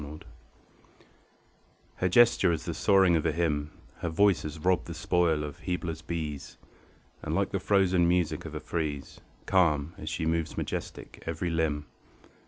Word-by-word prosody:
PHÈDRE 75 +1 -9 1.8
Her 90 - +1
gesture 115 -3 +5
is 80 - -3
the 85 - -3
soaring 95 +1 +4
of 80 - +1
a 80 - +1
hymn, 75 -2 -1 0.3
Her 85 - -3
voice 100 +3 +3
has 75 -1 -6
robbed 90 +4 +1
the 85 - -6
spoil 85 -2 +1
of 75 -1 -7
Hybla's 85 -3 -3
bees; 80 -3 -5 0.6
And - - -3
like - - 0
the - - -1
frozen 95 -3 +3
music 85 -2 +1
of 80 -1 -8
a - - -3
frieze, 75 -3 -4 0.2
Calm, 80 -4 +2
as 75 - -5
she 80 0 -2
moves 80 0 -1
majestic, - - -5
every 85 +1 -2
limb. 80 -3 0
80 Hz, 160 wpm, -28 LUFS, 75-90 Hz, 1.8 s, gesture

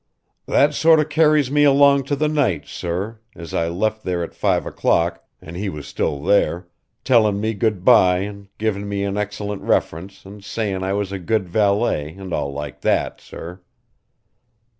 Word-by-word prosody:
"That 145 +1 +3
sort 160 +1 +5
of 155 0 0
carries 150 -3 +3
me 145 0 +3
along 140 -1 +5
to 145 - -1
the 150 +2 0
night, 140 - 0
sir 95 +6 -5 0.2
as 85 -2 -9
I 85 - 0
left 110 +6 -2
there 90 -2 -2
at - - -7
five - - 0
o'clock 85 +1 0 0.2
and 80 - -11
he 100 +3 -3
was 75 -5 -7
still 70 0 -3
there 90 -2 +1 0.4
tellin' 110 -6 +3
me 110 +2 -1
goodbye 95 -3 +3
and 100 0 -7
givin' 100 -2 -2
me 100 0 -2
an 100 0 -2
excellent 105 -1 -4
reference 95 +5 -2
and 100 +1 -12
sayin' 100 -3 -3
I 95 +1 -1
was 100 -1 -2
a 100 - -4
good 95 +2 -1
valet 100 -5 0
an' 95 -2 -8
all 70 - -2
like 75 0 -7
that, - - 0
sir. 90 +2 -10
100 Hz, 175 wpm, -21 LUFS, 90-115 Hz, 0.4 s, sort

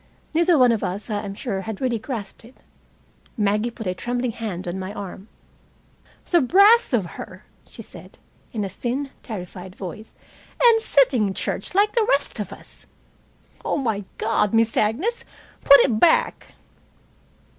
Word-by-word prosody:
Neither 340 +2 +4
of 245 -6 +4
us, 205 +5 -4
I 205 -1 -1
am 200 -1 -6
sure, 200 -5 -3
had 220 0 -6
really 245 -3 -1
grasped 220 -4 -6
it. 240 +3 -17 0.8
Maggie 210 +2 +1
put 225 -1 -9
a 185 - -1
trembling 245 +5 -2
hand 205 -6 -5
on 175 +2 -4
my 190 +1 -5
arm. 195 0 -8 1.0
"The 345 -2 +5
brass 400 - +5
of 230 -7 +1
her," 170 - -10 0.2
she - - -10
said, - - -13 0.3
in 215 -3 -3
a - - -2
thin, 265 +7 -4
terrified 185 -3 -8
voice. 205 +4 -9 0.4
"And 465 -2 +5
sitting 265 - +3
in 195 - -3
church 200 - -3
like 415 +2 +4
the 460 -3 +2
rest 280 -4 0
of 200 -2 -4
us. - - -14 0.8
Oh, - - -1
my 220 -7 -1
God, 220 -1 +1
Miss 225 0 +3
Agnes, 295 - 0 0.4
put 280 - +9
it 225 -5 +1
back!" 325 +6 +2
225 Hz, 155 wpm, -23 LUFS, 200-275 Hz, 1.0 s, put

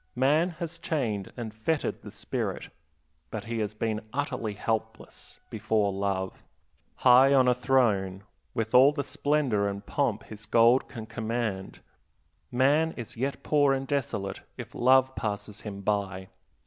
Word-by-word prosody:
Man 150 +7 +3
has 170 -1 -5
chained 110 - -2
and 115 -3 -5
fettered 145 +9 -2
the - - -9
spirit, - - -4 0.6
but 110 -2 -5
he 115 +1 -4
has 105 0 -2
been 110 0 -2
utterly 125 -5 -3
helpless 110 +1 -4
before 110 -2 0
love. 95 -1 -2 0.5
High 130 +2 +6
on 130 -2 +5
a 125 - +5
throne, 115 -7 +1 0.3
with 115 -2 -2
all 135 +4 +7
the 145 -1 -2
splendor 140 -8 0
and 100 0 -6
pomp 120 -7 -1
his 110 0 -11
gold 120 +3 +4
can 115 -4 -7
command, 110 -4 -3 0.7
man 145 +6 +3
is 120 -3 -6
yet 135 +4 -3
poor 145 -2 +3
and 135 0 -3
desolate, 115 -9 -2 0.2
if - - -8
love 130 +1 +4
passes 105 -1 -4
him 100 -2 -7
by. 100 -2 -2
115 Hz, 145 wpm, -28 LUFS, 105-135 Hz, 0.7 s, all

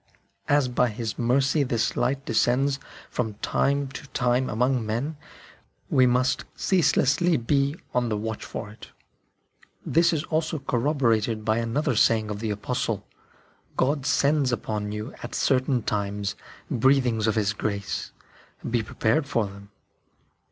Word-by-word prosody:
As 145 -2 +4
by 125 0 +2
His 110 0 -4
mercy 135 +5 +2
this 120 -4 0
light 135 +3 0
descends 135 +4 +2 0.3
from 110 -4 -2
time 140 +6 0
to 135 - -9
time 125 0 +1
among 125 +2 +1
men, 120 +9 -2 0.8
we 130 -1 +5
must 130 +1 +2
ceaselessly 160 -1 +3
be 140 +4 +1 0.2
on 125 -1 +1
the 105 - 0
watch 110 +1 -4
for 105 -1 -6
it. 110 - -12 1.0
This 170 +1 +3
is 160 -3 -1
also 160 0 -1
corroborated 120 -5 0
by 110 +1 +2
another 120 +3 0
saying 110 -1 +3
of 105 - -4
the 110 0 -2
Apostle: 105 0 -2 0.4
" - - -32 0.3
God 140 0 +1
sends 145 -2 +2
upon 105 -3 -2
you, 105 +3 -5
at - - -6
certain 130 -2 +1
times, 100 -1 -2 0.4
breathings 125 -4 +3
of 110 - +2
His 105 -2 +1
grace; 100 -2 -3 0.6
be 120 0 +1
prepared 115 +6 0
for 115 -5 +1
them." 100 0 -11
125 Hz, 140 wpm, -25 LUFS, 110-140 Hz, 1.0 s, we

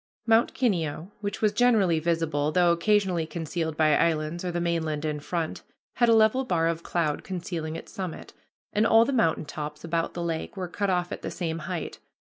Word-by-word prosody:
Mount 225 0 +3
Kineo, 175 - -1
which 205 +1 -4
was 210 - +4
generally 205 -7 +3
visible, 155 -3 0
though 175 0 +4
occasionally 180 -1 +2
concealed 160 0 -3
by 155 -1 +4
islands 165 +1 0
or 180 - -2
the 175 - -2
mainland 160 -3 -1
in 150 -1 -2
front, 165 +2 -3 0.4
had 240 -2 +4
a 230 - +6
level 220 +4 +4
bar 170 -9 +1
of 165 0 -1
cloud 165 -4 -1
concealing 170 -4 -4
its - - -8
summit, 185 -4 -6 0.4
and 215 +2 +3
all 225 0 +6
the 275 - -1
mountain 165 -10 +2
tops 150 0 -6
about 165 0 -2
the 175 - -3
lake 165 +4 -3
were 185 -1 -3
cut 200 +3 -2
off 180 -1 0
at - - -5
the - - -4
same 165 -3 -3
height. 170 +1 -5
170 Hz, 195 wpm, -27 LUFS, 160-195 Hz, 0.4 s, a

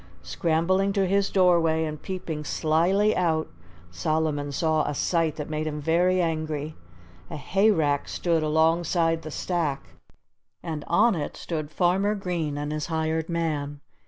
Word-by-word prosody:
Scrambling 170 - +1
to 195 -1 +2
his 195 +1 +1
doorway 170 -4 +3
and 155 -1 -6
peeping 175 -5 -5
slyly 175 +8 +2
out, 160 -3 +1 0.4
Solomon 145 - -1
saw 155 +1 +1
a 150 - -2
sight 165 -1 0
that 150 - -5
made 155 0 -3
him 150 -1 -3
very 175 +4 +2
angry. 155 -3 -2 0.5
A - - -6
hayrack 160 -3 +1
stood 170 -2 0
alongside 165 +1 +2
the 155 - -7
stack; 155 -3 -2 0.7
and 155 -3 -4
on 225 +7 +4
it 155 -5 -4
stood 155 -3 -4
Farmer 190 +5 +1
Green 170 -7 -3
and 145 +1 -3
his 150 -1 -3
hired 160 0 -1
man. 150 -4 -2
160 Hz, 140 wpm, -25 LUFS, 155-175 Hz, 0.7 s, on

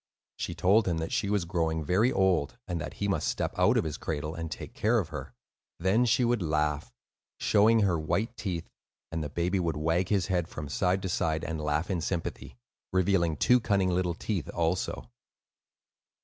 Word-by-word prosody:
She - - -4
told 100 +3 +3
him 85 -2 +1
that 80 0 -3
she 100 - 0
was 100 -4 +1
growing 80 -2 -1
very 100 - +3
old 95 -3 +1
now; 90 - -4
that 85 -3 -4
he - - -2
must - - 0
step - - -1
out - - +4
of - - +2
his 80 -2 -4
cradle 75 0 -3
and 85 -1 -5
take - - -7
care - - +2
of - - -1
her. - - -7 0.4
Then 95 +8 +3
she 120 +1 +3
would 120 -2 +1
laugh, 75 -2 0 0.5
showing 110 +2 +4
her 90 -5 +2
white 105 +9 -1
teeth, 90 -8 -4 0.4
and 80 -1 -2
the 75 - -4
baby 90 +5 0
would 85 -4 -1
wag 80 +4 +1
his 100 -4 +2
head 90 -3 0
from 75 -4 -7
side 90 +5 +1
to 95 - -2
side, 80 -2 0
and 80 -2 -3
laugh 75 +4 -1
in 90 -3 -1
sympathy, 85 -8 -4 0.3
revealing 90 -4 +2
two 125 - +5
cunning 100 -4 +1
little 90 -1 0
teeth 95 -3 -3
also. 85 +2 -1
90 Hz, 190 wpm, -29 LUFS, 80-100 Hz, 0.5 s, two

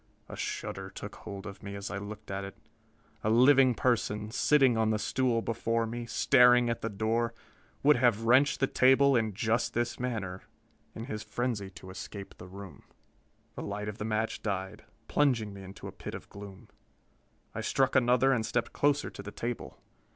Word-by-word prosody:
A - - -8
shudder - - -4
took - - -8
hold 100 0 -8
of 100 -1 -8
me 100 0 -7
as 100 0 -6
I 100 - -3
looked 105 0 -8
at 100 0 -3
it. 100 - -8 0.7
A 110 - +1
living 130 +2 +6
person, 105 -3 0
sitting 135 0 +4
on 110 -1 +2
the 110 - +2
stool 115 +2 0
before 115 0 0
me, 120 +1 -5
staring 125 -1 +5
at 115 - -4
the 115 - -2
door, 115 +3 -1 0.5
would 150 0 +6
have 120 -3 +2
wrenched 130 +6 +4
the - - +5
table 135 +1 +4
in 110 -4 0
just 115 +3 0
this 120 -1 -1
manner 105 -7 -3 0.5
in 110 - -6
his 110 -5 -5
frenzy 115 -6 -3
to 95 - -10
escape 95 +1 -8
from - - -13
the 90 - -12
room! 95 -6 -10 0.7
The - - -7
light 105 +1 -4
of 105 +1 -6
the 105 - -3
match 110 0 -1
died, 95 0 -4 0.2
plunging 120 -8 +1
me 100 - -10
into 95 +1 -11
a - - -6
pit - - -8
of - - -10
gloom. 100 -1 -11 0.8
I - - -4
struck 135 0 +1
another 125 +1 +4
and 115 -4 0
stepped 115 +2 -2
closer 145 0 +1
to - - -9
the 100 - -8
table. 120 +2 -5
115 Hz, 190 wpm, -30 LUFS, 100-125 Hz, 0.8 s, living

